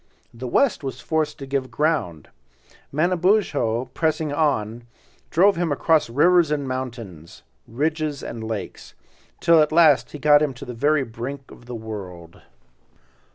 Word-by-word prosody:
The 120 +2 -7
West 245 - +1
was 135 - -5
forced 155 -2 -2
to 135 - -8
give 135 -1 -2
ground. 115 - -1 0.6
Manabozho 165 - +1
pressing 155 -2 -1
on, 120 -7 -1 0.4
drove 195 +2 +4
him 170 -2 -1
across 155 -1 +2
rivers 170 +6 +4
and 145 -2 -2
mountains, 115 -11 -7 0.2
ridges 150 +3 -2
and 115 -1 -6
lakes, 110 -2 -6 0.4
till 165 -2 +5
at 150 - +1
last 165 0 +4
he - - -5
got 145 +1 +5
him 145 -4 -1
to 135 - -9
the 125 - -7
very 145 +4 +1
brink 130 +4 -7
of 120 - -15
the 125 - -6
world. 95 -7 -9
140 Hz, 145 wpm, -22 LUFS, 115-155 Hz, 0.6 s, till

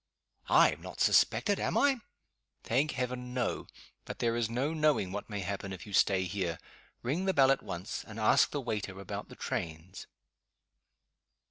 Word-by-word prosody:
"I - - +6
am - - -8
not - - -9
suspected, - - +3
am - - 0
I?" 280 -2 +4 0.7
"Thank 140 +6 +1
heaven 125 -1 -4
no. 125 -2 -1 0.4
But - - -7
there 115 -1 0
is 120 -2 0
no 130 +7 -1
knowing 150 - +2
what 105 +3 -5
may 100 -2 -3
happen 100 +1 -4
if 95 -2 -7
you 105 - -10
stay 95 0 +4
here. 90 -2 -2 0.5
Ring 155 +10 -1
the 190 - +1
bell 135 -1 +6
at 135 - +1
once, 90 +8 -5
and 110 -1 -9
ask 110 - +4
the 145 - -3
waiter 105 -5 -4
about 100 - -6
the - - -11
trains." 80 +3 -5
110 Hz, 170 wpm, -31 LUFS, 95-130 Hz, 0.7 s, I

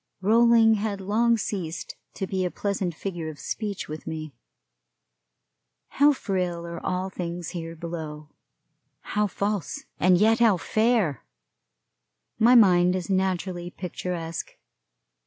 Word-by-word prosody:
Rolling 225 +2 +5
had 205 -2 -2
long 230 +4 +2
ceased 185 -6 -4 0.2
to 190 - -2
be 190 0 -2
a 180 - 0
pleasant 190 -3 -2
figure 175 -3 -4
of 150 - -10
speech 205 -3 -4
with 155 +1 -8
me. 155 -2 -5 1.6
How 290 +1 +5
frail 180 -9 -2
are 170 0 -7
all 185 +1 -2
things 175 -1 -5
here 165 -2 -6
below, 155 -2 -6 0.8
how 210 0 +2
false, 200 0 -3
and 180 0 +5
yet 220 +4 +4
how 225 -5 +5
fair! 215 - +1 1.2
My 240 +3 +6
mind 180 -5 +6
is 185 +1 -3
naturally 185 -2 -1
picturesque. 175 -2 -5
185 Hz, 120 wpm, -26 LUFS, 170-210 Hz, 1.6 s, My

